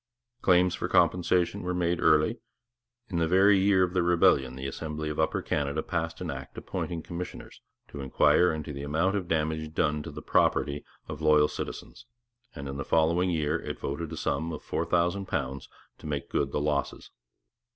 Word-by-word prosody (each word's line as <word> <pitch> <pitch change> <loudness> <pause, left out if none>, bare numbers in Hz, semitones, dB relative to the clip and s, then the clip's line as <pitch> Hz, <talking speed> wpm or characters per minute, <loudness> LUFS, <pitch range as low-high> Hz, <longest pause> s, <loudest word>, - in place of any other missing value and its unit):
Claims 90 -1 +4
for - - -3
compensation 90 0 +2
were 90 0 -2
made 85 -1 0
early. 80 +10 +3 0.7
In 85 -4 -1
the 80 - +2
very 95 +3 +5
year 95 -1 +4
of 90 -1 -1
the 90 - +2
rebellion 85 -7 +3
the 65 +1 -6
Assembly 75 +2 -4
of 75 - -4
Upper 80 - 0
Canada 75 +1 -1
passed 80 0 -3
an 85 -4 -3
Act 65 -1 -8
appointing 85 -3 -4
commissioners 90 +1 -7 0.3
to 70 - -7
inquire 70 +6 +3
into 80 -1 -5
the 70 - -6
amount 80 +7 0
of 95 -4 -2
damage 80 -1 -1
done 75 0 +1
to - - -7
the - - -9
property 70 0 +1 0.2
of 80 -1 -7
loyal 75 -1 +5
citizens; 120 - -7 0.5
and 70 -1 -6
in 70 0 -5
the 70 - -3
following 85 +4 +2
year 80 -1 0
it - - -5
voted 75 +3 -4
a 80 - -6
sum 80 +2 -1
of 80 - -7
£4000 85 -5 -1 0.3
to - - -9
make 70 -2 -3
good - - 0
the - - -1
losses. 75 -1 -2
80 Hz, 180 wpm, -28 LUFS, 75-90 Hz, 0.7 s, very